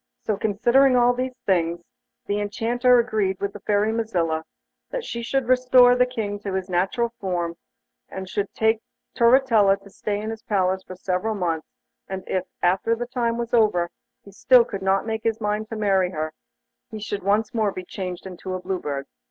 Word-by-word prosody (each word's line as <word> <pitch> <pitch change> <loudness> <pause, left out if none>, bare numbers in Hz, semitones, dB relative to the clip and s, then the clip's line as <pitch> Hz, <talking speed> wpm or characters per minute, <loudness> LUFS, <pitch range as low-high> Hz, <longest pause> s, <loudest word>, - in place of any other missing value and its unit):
So 215 - 0
considering 240 +6 +3
all 245 0 +5
these 255 +1 -3
things 170 -2 +1 0.4
the 205 +1 -1
Enchanter 240 +4 +2
agreed 215 -5 0
with 200 0 -3
the 205 - -9
Fairy 205 +2 +1
Mazilla 170 -8 -1 0.4
that - - -4
she 235 - -4
should 260 +1 -1
restore 250 -1 +6
the 250 0 +3
King 210 -5 -4
to 200 -2 -5
his 190 0 -3
natural 195 +7 0
form, 175 -4 -2 0.5
and 190 0 -6
should 200 +1 -2
take 220 0 +2 0.3
Turritella 235 -5 +4
to 200 - -15
stay 205 +1 -3
in 215 +1 -4
his 225 -1 -7
palace 190 -4 0
for 185 - -10
several 185 +4 -2
months, 165 -5 -2 0.4
and 190 -1 -5
if, 185 -1 -1 0.2
after 190 +6 +2
the 240 +1 -4
time 240 -2 -1
was 235 0 -4
over 205 -7 +3 0.3
he 200 - -13
still 245 +4 +5
could 200 -4 -6
not 190 +1 +1
make 220 -1 -2
up - - -37
his 225 -1 0
mind 210 0 -2
to 225 - -5
marry 195 -4 +2
her, 155 -2 -4 0.6
he 220 - -7
should 205 -1 -4
once 210 +5 +1
more 215 -3 +1
be 185 -1 -7
changed 180 -1 -6
into 185 0 -6
a - - -3
Blue 185 0 -3
Bird. 140 -3 -4
205 Hz, 195 wpm, -24 LUFS, 190-235 Hz, 0.6 s, restore